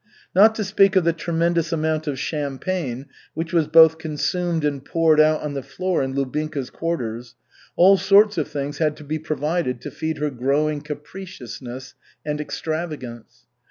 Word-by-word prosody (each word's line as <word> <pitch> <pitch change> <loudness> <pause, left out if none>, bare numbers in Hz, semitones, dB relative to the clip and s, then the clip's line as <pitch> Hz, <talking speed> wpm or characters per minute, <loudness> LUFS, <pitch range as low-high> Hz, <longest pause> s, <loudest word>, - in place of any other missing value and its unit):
Not 215 +4 +6
to 220 - -2
speak 195 0 +3
of 185 - +5
the 170 0 +2
tremendous 170 0 0
amount 155 -1 -1
of 140 -2 -2
champagne 140 -1 -3 0.3
which 165 +2 -4
was 165 -3 +3
both 160 0 +6
consumed 165 +1 -1
and 140 -2 -2
poured 160 -1 +3
out 155 0 +4
on 150 -1 -3
the 140 - -3
floor 185 +6 -2
in 135 0 -3
Lubinka's 140 0 -3
quarters, 120 -8 -4 0.4
all 195 +3 +6
sorts 205 -1 +4
of 150 - -1
things 145 0 -5
had 155 -2 +1
to - - -11
be 155 +2 -3
provided 155 -3 -2
to - - -7
feed 160 -1 -3
her 150 0 -1
growing 145 +4 0
capriciousness 145 - -8 0.3
and 150 0 -2
extravagance. 150 -7 -6
155 Hz, 160 wpm, -22 LUFS, 140-170 Hz, 0.4 s, Not